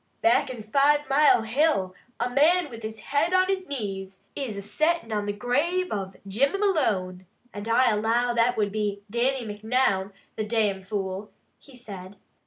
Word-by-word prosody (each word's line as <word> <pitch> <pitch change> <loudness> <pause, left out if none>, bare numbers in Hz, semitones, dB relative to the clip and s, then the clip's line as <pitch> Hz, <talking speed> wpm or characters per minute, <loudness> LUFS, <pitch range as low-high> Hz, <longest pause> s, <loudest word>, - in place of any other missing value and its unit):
"Back 335 -5 +4
in 240 -4 -7
Five 285 +6 +3
Mile 285 -5 +5
Hill, 225 - +1 0.3
a 240 - +1
man 300 +5 +3
with 230 -1 -9
his 220 0 -6
head 305 +6 +1
on 370 0 +5
his 375 -1 -2
knees, 195 -7 -5 0.2
is 245 -8 -4
a - - -4
settin' 310 - 0
on 205 -1 -1
the - - 0
grave 290 - 0
of 195 -2 -4
Jimmy 270 - +1
Malone, 195 - 0 0.3
and 205 +1 -6
I 235 +2 +4
allow 230 +3 +1
that 235 +1 +2
would 205 -2 +1
be 205 -1 -2
Dannie 250 +2 0
Macnoun, 210 -2 0 0.3
the 215 - -1
damn 210 -3 0
fool!" 195 0 -4 0.3
he 275 - -17
said. 195 -5 -10
230 Hz, 170 wpm, -26 LUFS, 205-280 Hz, 0.3 s, Mile